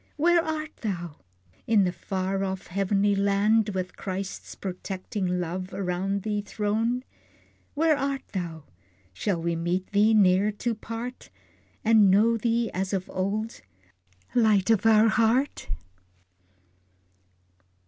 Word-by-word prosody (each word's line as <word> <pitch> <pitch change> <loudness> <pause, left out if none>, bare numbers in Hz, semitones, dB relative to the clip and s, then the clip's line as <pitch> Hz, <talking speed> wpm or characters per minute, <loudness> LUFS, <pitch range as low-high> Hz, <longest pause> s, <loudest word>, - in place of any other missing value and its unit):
Where 340 +2 +4
art 315 -1 -4
thou? 175 -8 -4 0.5
In 220 -3 +4
the 180 - +1
far 190 +2 -2
off 190 -1 -3
heavenly 200 +2 +1
land, 200 +2 +2
With 185 -2 -4
Christ's 190 0 -5
protecting 185 0 -3
love 180 +2 -4
around 195 +1 -2
thee 210 -1 -1
thrown? 220 +4 -1 0.7
Where 315 +1 +3
art 275 -1 -2
thou? 170 -5 -5 0.5
Shall 175 - -1
we 170 0 -1
meet 175 +4 -2
thee 210 +2 +4
ne'er 195 0 +4
to 235 +3 -2
part, 230 +3 -7 0.6
And 215 -3 +6
know 215 +5 +4
thee 230 +1 0
as 190 +2 -2
of 185 -1 -2
old 210 +4 -2 0.7
Light 215 -4 +3
of 225 0 +3
our 220 0 +6
heart? 235 +5 +1
200 Hz, 120 wpm, -26 LUFS, 185-225 Hz, 0.7 s, And